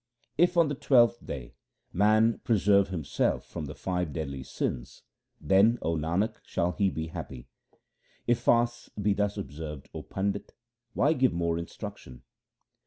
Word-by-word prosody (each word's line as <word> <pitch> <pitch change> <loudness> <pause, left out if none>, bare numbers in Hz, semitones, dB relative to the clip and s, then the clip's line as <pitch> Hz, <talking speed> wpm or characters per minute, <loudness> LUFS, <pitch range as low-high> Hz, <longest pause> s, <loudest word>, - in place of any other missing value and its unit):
If 175 +1 +3
on 170 -2 +6
the 145 - -2
twelfth 120 -4 +3
day 65 -2 -7 0.4
man 110 +4 +4
preserve 100 -3 +3
himself 85 -7 -1
from 75 - -6
the 70 - -8
five 90 -4 -2
deadly 70 -5 -4
sins, 60 -1 -4 0.4
then, 100 +5 +4
O 85 +1 0
Nanak, 85 +7 0
shall 85 +1 -1
he 100 +1 +1
be 80 -2 -4
happy. 65 -5 -8 0.8
If 120 0 +2
fasts 120 0 +1
be 100 0 +2
thus 105 0 -1
observed, 75 -6 -7
O - - -5
Pandit, 100 +1 -3 0.4
why 145 +4 +3
give 130 - +2
more 85 -1 0
in 85 - -5
struction 65 -1 -9
95 Hz, 150 wpm, -28 LUFS, 80-115 Hz, 0.8 s, on